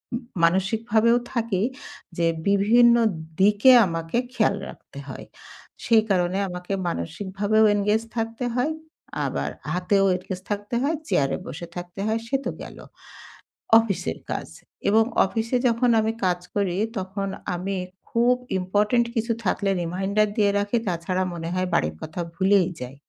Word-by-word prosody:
উম 245 - -4 0.2
মানসিকভাবেও 220 +6 +3 0.2
থাকেই। 225 -4 0 0.5
যে 170 -1 +2 0.2
বিভিন্ন 225 +4 +5 0.5
দিকে 210 +6 +6
আমাকে 165 +2 -3 0.2
খেয়াল - - +2
রাখতে - - -14
হয়। - - -8 0.6
সেই 225 -2 +5
কারণে 180 0 +1
আমাকে 180 +2 -5
মানসিকভাবেও 200 +6 0
engage 210 +2 +1
থাকতে 225 +2 -3
হয়। 255 +5 +1 0.5
আবার - - -2 0.2
হাতেও 195 +2 +2
engage 185 0 -7
থাকতে 205 +3 -3
হয়, 300 +4 +1
চেয়ারে 135 - +1
বসে 170 +5 -7
থাকতে 175 +2 -8
হয়, 220 +1 0
সে 270 - -1
তো - - -1
গেল - - -9 1.0
অফিসের 225 -4 -2
কাজ। - - -3 0.4
এবং 220 +2 +5 0.2
অফিসে 225 +5 -1
যখন 235 +1 +2
আমি 220 +1 0
কাজ 180 -1 +1 0.2
করি, 190 -3 0 0.2
তখন 195 +1 -4 0.3
আমি 195 +2 -3 0.3
খুব 240 +2 +3 0.2
ইম্পোর্টেন্ট 210 +6 +1
কিছু 230 +1 0
থাকলে 195 +1 0
reminder 190 +5 0
দিয়ে 205 -3 +3
রাখি। 205 +3 0
তাছাড়া 180 +1 -1
মনে 165 -1 -5
হয় 185 0 -1
বাড়ির 80 +1 0
কথা 160 +3 -5
ভুলেই 190 -1 +3
যাই। 125 +1 -7
200 Hz, 140 wpm, -24 LUFS, 180-225 Hz, 1.0 s, দিকে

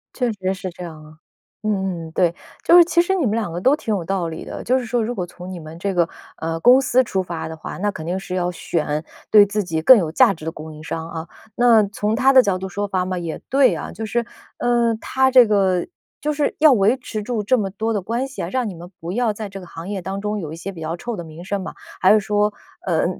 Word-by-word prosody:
确 245 -3 0
实 190 -2 -2
是 190 0 -5
这 180 - -9
样 160 -3 -9
啊， 155 0 -16 0.5
嗯， 190 -6 -2
对。 175 -1 +2 0.3
就 340 - +6
是 350 - +10
其 345 0 +3
实 380 +2 0
你 345 -7 +1
们 210 - +1
两 220 -6 -2
个 175 +2 -4
都 265 +8 +4
挺 225 -7 -3
有 185 - -3
道 180 0 -1
理 160 -1 -7
的， - - -7
就 255 +2 +2
是 250 - -5
说 240 0 0
如 235 +3 -2
果 180 - -2
从 180 +1 -10
你 180 - -6
们 155 0 -10
这 195 +2 -1
个， 175 -2 +2 0.3
呃， 165 0 -3
公 250 +8 +6
司 255 0 +3
出 195 -6 -1
发 170 -2 -5
的 160 - -6
话， - - -7
那 205 +2 0
肯 165 -5 -8
定 180 +3 -2
是 185 -1 -5
要 180 -1 0
选 155 -3 -2 0.3
对 210 -1 +8
自 205 +1 -1
己 160 -3 -2
更 250 +10 +8
有 165 -6 -1
价 230 +4 +5
值 160 -3 -11
的 165 - -2
供 155 0 -9
应 155 +1 -11
商 165 0 -5
啊。 165 0 -6 0.3
那 235 -3 +5
从 210 +2 -1
他 265 +3 +4
的 260 - +9
角 200 -6 0
度 190 +1 -5
出 205 +2 -3
发 185 -2 -1
嘛， 185 0 -3
也 170 -2 -4
对 265 -8 +4
啊， 155 - -6
就 220 +5 -5
是， 220 +3 0 0.4
呃， 240 -1 +2
他 265 0 +2
这 250 -2 +7
个 190 -4 +2 0.3
就 300 0 0
是 290 -1 0
要 310 -1 +7
维 220 +3 +3
持 225 -4 -5
住 225 -1 -2
这 255 +5 +3
么 200 -4 -1
多 220 +4 -2
的 205 - -1
关 235 +8 -2
系 270 - -7
啊， - - -4
让 255 -4 -1
你 185 - -8
们 175 +2 -11
不 165 +1 -5
要 230 +1 +1
在 210 0 -6
这 195 0 -8
个 180 - -11
行 165 +3 -8
业 200 -2 -3
当 190 +2 -4
中 210 0 -2
有 160 -5 -6
一 - - -6
些 180 +4 -6
比 170 -4 -10
较 160 +2 -3
臭 235 +6 -4
的 175 - -6
名 160 +1 -11
声 200 +1 -2
嘛， 190 - -6 0.3
还 190 - +6
是 215 - +5
说， 210 0 +1 0.3
呃， 165 -4 +1
195 Hz, 295 characters per minute, -21 LUFS, 175-230 Hz, 0.5 s, 是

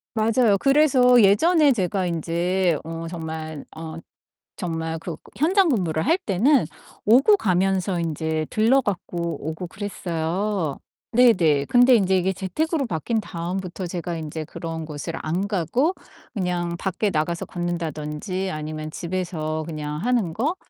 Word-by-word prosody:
맞아요. 220 -1 +3
그래서 265 -4 +5
예전에 295 - +5
제가 190 -2 -1
인제 170 +1 0
어 165 +1 -6
정말 160 -2 -6
어 160 0 -7 0.6
정말 165 -2 -3
그 165 -1 -6 0.2
현장 365 +6 +3
근무를 175 - 0
할 330 +5 +4
때는 245 - +2 0.4
오고 265 - +6
가면서 190 - +1
인제 160 -1 -2
들러 230 +5 +3
갖고 185 -4 -4 0.3
오고 170 +3 -5
그랬어요. 180 -3 -2 0.4
네네. 175 - +4
근데 245 - +6
인제 190 -3 +3
이게 185 +1 +1
재택으로 275 - -1
바뀐 220 +4 -1
다음부터 180 0 -4
제가 175 0 -4
인제 155 -1 -5
그런 160 0 -6
곳을 155 +2 -6
안 175 +6 -1
가고 235 - +1 0.4
그냥 175 -4 -2
밖에 195 +3 -1
나가서 170 +1 -1
걷는다든지 175 +1 -3
아니면 155 0 -5
집에서 165 -3 -3
그냥 150 -2 -5
하는 220 -3 0
거 285 - 0
180 Hz, 280 characters per minute, -23 LUFS, 160-220 Hz, 0.6 s, 오고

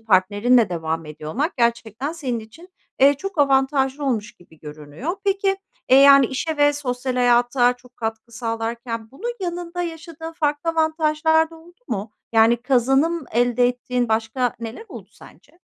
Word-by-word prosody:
partnerinle 215 +3 +3
devam 165 -2 -3
ediyor 155 0 -8
olmak, 290 - -2
gerçekten 235 +3 -1
senin 260 -8 -3
için, 225 +12 -15 0.3
eee, 280 +2 +6
çok 380 +4 -7
avantajlı 270 0 +2
olmuş 225 -6 -1
gibi 165 -3 -21
görünüyor. 150 - -6
Peki, 390 0 +1 0.3
eee, 260 - +6
yani, 275 -1 +8
işe 310 +5 -3
ve 290 0 +4
sosyal 255 -3 -3
hayata 245 0 +3
çok 250 0 -20
katkı 225 0 -5
sağlarken 230 -1 -4
bunun 465 - -5
yanında 350 -1 -4
yaşadığın 325 -1 -7
farklı 300 -1 -1
avantajlar 320 0 +2
da 330 - -13
oldu 345 +4 -19
mu? 205 +1 -3 0.2
Yani, 225 +1 +5
kazanım 270 +6 +2
elde 245 +1 +3
ettiğin 245 -1 -2
başka 225 +3 0
neler 230 - -7
oldu - - -10
sence? 340 - -18
255 Hz, 150 wpm, -22 LUFS, 230-315 Hz, 0.3 s, yani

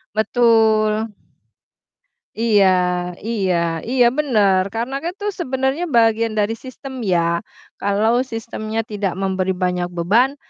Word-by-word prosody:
Betul. 220 -1 +2 1.2
Iya 215 -4 +3 0.6
iya 180 -7 0
iya 250 0 +3
bener, 205 -10 +2
karena 240 +4 -2
kan 345 - -3
tuh 415 +1 -3
sebenarnya 265 +3 -1
bagian 230 -4 +2
dari 210 0 +1
sistem 260 0 -8
ya, 170 -6 +1 0.4
kalau 215 +4 +2
sistemnya 225 -1 -4
tidak 205 -4 -3
memberi 190 0 -1
banyak 180 -1 0
beban, 225 +11 +2
220 Hz, 110 wpm, -20 LUFS, 195-240 Hz, 1.2 s, Iya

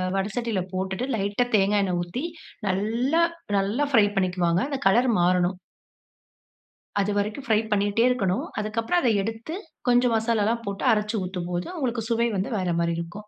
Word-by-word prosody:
வட 195 0 +1
சட்டியில 230 -5 -1
போட்டுட்டு, 190 +5 -2
லைட்டா 205 +3 0
தேங்காய் 200 0 +3
எண்ணெய் 180 -2 0
ஊத்தி, 175 - -4 0.4
நல்லா 230 - +1 0.3
நல்லா 205 +9 +1
ஃபிரை 225 -6 +6
பண்ணிக்குவாங்க. 180 -2 +1
அந்த 275 -2 -3
கலர் 240 +6 +4
மாறணும். 180 +1 +2 1.4
அது 200 +1 +1
வரைக்கும் 210 +6 -2
ஃபிரை 220 -2 +3
பண்ணிட்டே 205 +2 +2
இருக்கணும். 195 -7 0 0.2
அதுக்கு 215 +2 -2
அப்புறம் 350 +10 +1
அத 250 - +3
எடுத்து, 225 - -5 0.3
கொஞ்சம் 245 -1 +4
மசாலால்லாம் 225 0 +1
போட்டு 200 +4 -3
அரச்சு 210 +1 -1
ஊத்தும் 180 -1 -4
போது, 175 0 -2
உங்களுக்கு 250 -6 -1
சுவை 235 0 +2
வந்து 190 - -2
வேற 185 -2 -1
மாதிரி 170 0 +1
இருக்கும். 190 +5 -7
210 Hz, 160 wpm, -25 LUFS, 190-235 Hz, 1.4 s, ஃபிரை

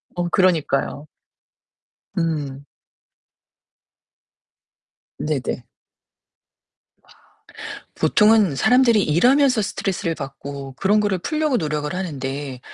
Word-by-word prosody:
어 175 0 -1
그러니까요. 155 -6 +1 1.1
음. 145 -5 -2 2.5
네네. 140 -5 -2 1.4
와. - - -29 0.9
보통은 210 -8 +4
사람들이 245 - +4
일하면서 250 - +3
스트레스를 190 -4 -2
받고 140 -1 -7
그런 200 +8 +2
거를 205 -3 0
풀려고 305 - 0
노력을 150 -3 -2
하는데 140 -6 -4
165 Hz, 195 characters per minute, -21 LUFS, 140-210 Hz, 2.5 s, 보통은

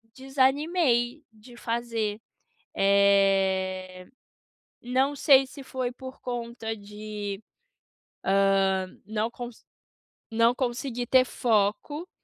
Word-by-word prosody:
desanimei 270 0 +1
de 235 +3 -16
fazer, 230 -3 -2 0.6
eh, 195 -2 +2 0.8
não 260 +4 +1
sei 270 -1 +5
se 275 +1 -11
foi 255 -2 -3
por 260 +1 -10
conta 235 -2 -4
de, 210 -1 -7 1.3
hã, 190 -1 -1 0.2
não 215 +1 -1
conse 240 -1 -9 0.7
não 230 +1 +4
consegui 245 -1 -3
ter 255 +1 +5
foco, 240 - 0
235 Hz, 90 wpm, -27 LUFS, 205-260 Hz, 1.3 s, sei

